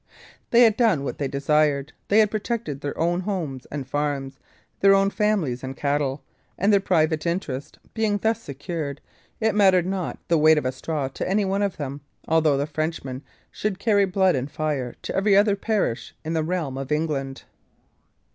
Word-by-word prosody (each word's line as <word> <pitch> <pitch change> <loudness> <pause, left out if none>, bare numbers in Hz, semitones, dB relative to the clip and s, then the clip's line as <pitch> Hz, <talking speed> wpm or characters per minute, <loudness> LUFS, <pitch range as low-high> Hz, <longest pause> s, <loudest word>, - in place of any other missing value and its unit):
They 240 +1 +6
had 220 -2 +4
done 215 - +3
what - - -4
they 140 - 0
desired; 145 +1 +1
they 205 - +3
had 215 -2 +5
protected 215 - -3
their 145 - -4
own 175 +2 +1
homes 175 -10 -4
and 140 -3 -5
farms, 140 -1 -2 0.4
their 195 0 +6
own 195 0 +3
families 195 -15 0
and 130 0 -6
cattle; 140 -1 -1 0.3
and 200 +3 +3
their 200 - +6
private 160 -4 +1
interest 150 -6 -3 0.2
being 220 -2 +1
thus 225 +2 0
secured, 145 -2 -5 0.4
it 220 -1 +2
mattered 190 -3 +4
not 190 -1 -3
the 165 -2 +3
weight 155 +1 +6
of 150 - -1
a 130 - +1
straw 145 +1 -3
to 135 - -4
any 200 +1 +2
one 195 +1 0
of 200 -2 -1
them, 145 -1 -5 0.3
although 160 -3 +3
the 140 - 0
Frenchmen 155 -4 -4 0.3
should 210 -3 -2
carry 205 -1 +3
blood 190 0 +2
and 130 +2 -2
fire 145 -6 -2
to - - -4
every 195 0 +4
other 205 0 +4
parish 200 - -2
in 160 - -2
the 160 - +1
realm 155 -6 -2
of 135 0 -6
England. 145 -3 -2
160 Hz, 185 wpm, -24 LUFS, 140-195 Hz, 0.4 s, They